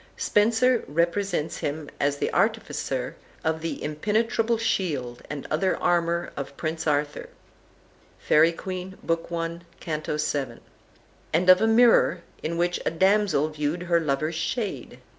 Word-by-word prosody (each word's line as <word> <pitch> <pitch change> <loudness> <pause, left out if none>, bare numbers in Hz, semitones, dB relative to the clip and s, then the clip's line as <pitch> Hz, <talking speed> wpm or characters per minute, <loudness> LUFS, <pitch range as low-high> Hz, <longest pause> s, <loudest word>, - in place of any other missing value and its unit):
Spenser 230 +3 +3
represents 170 +1 0
him 150 +1 -3
as 145 0 +1
the - - -2
artificer - - -1 0.3
of 160 0 0
the 165 - -4
impenetrable 220 +8 0
shield 145 - -1
and 145 -2 -5
other 185 +5 +1
armor 170 0 0
of 140 0 -6
Prince 160 0 -3
Arthur 145 0 -1 0.9
("Faery 160 +2 +4
Queene," 185 +2 -6
Book 165 0 -1
I., 170 0 -3 0.2
Canto 155 -1 -3
vii.), 140 -5 -2 0.7
and 180 +3 +2
of 185 - +5
a 220 - +4
mirror, 225 -6 +5 0.2
in 165 +2 -3
which 175 +1 0
a - - +1
damsel 190 -3 +2
viewed 155 +3 -2
her 170 -1 +2
lover's 155 +1 -1
shade. 195 +7 -3
165 Hz, 135 wpm, -25 LUFS, 150-190 Hz, 0.9 s, of